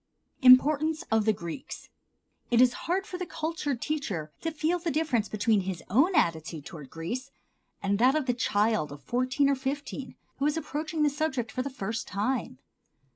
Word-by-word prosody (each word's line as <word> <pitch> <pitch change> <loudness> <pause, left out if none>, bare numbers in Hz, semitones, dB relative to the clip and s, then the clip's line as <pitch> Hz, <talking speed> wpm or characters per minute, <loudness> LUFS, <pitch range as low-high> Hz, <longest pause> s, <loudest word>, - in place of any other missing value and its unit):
Importance 295 +5 +6
of 220 -1 +3
the 220 - +5
Greeks. 170 +4 -7 0.6
It 235 - +3
is 250 -1 +6 0.2
hard 380 +3 +1
for 360 - -6
the 365 - -2
cultured 310 -5 -3
teacher 200 - -3
to 330 - -1
feel 320 +3 0
the 340 0 -2
difference 275 -8 0
between 215 0 +2
his 185 -2 -5
own 300 - +4
attitude 160 -2 0
toward 150 -5 -9
Greece 240 +12 -5 0.5
and 200 +1 +1
that 255 +4 +5
of 305 -3 +1
the 250 - +1
child 215 -7 +1
of 145 0 -10
fourteen 255 +3 +1
or 280 - +4
fifteen 270 -1 -4 0.2
who 280 - +2
is 300 - 0
approaching 310 0 -2
the 295 - +4
subject 275 -6 -2
for 255 - -2
the 275 - -3
first 225 -4 -4
time. 210 - -2
255 Hz, 180 wpm, -28 LUFS, 210-300 Hz, 0.6 s, Importance